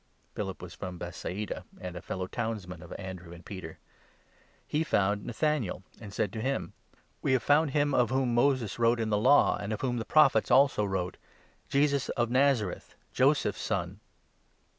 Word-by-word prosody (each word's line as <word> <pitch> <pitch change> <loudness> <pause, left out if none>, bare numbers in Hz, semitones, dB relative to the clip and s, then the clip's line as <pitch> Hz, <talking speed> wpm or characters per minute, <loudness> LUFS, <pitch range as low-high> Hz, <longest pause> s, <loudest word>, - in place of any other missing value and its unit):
Philip 95 -3 -5
was 90 -1 -8
from 90 +1 -6
Bethsaida, 90 +4 -5 0.2
and 90 -1 -6
a 90 - -6
fellow 95 -1 -4
townsman 100 -5 -4
of 90 - -12
Andrew 95 -2 -7
44 85 - -10
and 85 - -14
Peter. 90 -5 -8 0.9
He 150 +2 0
found 100 -7 +1
Nathanael 125 - -1 0.2
and 105 -3 -9
said 105 +1 -1
to 110 - -4
him: 135 +3 -2 0.2
45 - - -31 0.2
"We - - +1
have 130 -4 +2
found 145 +2 +4
him 145 +1 +1
of 125 -2 +3
whom 130 -2 +1
Moses 120 -4 +1
wrote 115 0 +3
in 110 -1 -1
the 105 - +3
Law, 130 +6 +5
and 100 +1 -5
of 110 - -3
whom 125 -2 0
the 115 - -2
Prophets 155 +6 +4
also 130 -3 +5
wrote 95 -2 -2 0.3
— - - -35
Jesus 140 -1 +2
of 120 -1 +1
Nazareth, 130 -7 +1 0.2
Joseph's - - +2
son - - -2
110 Hz, 185 wpm, -29 LUFS, 95-130 Hz, 0.9 s, Law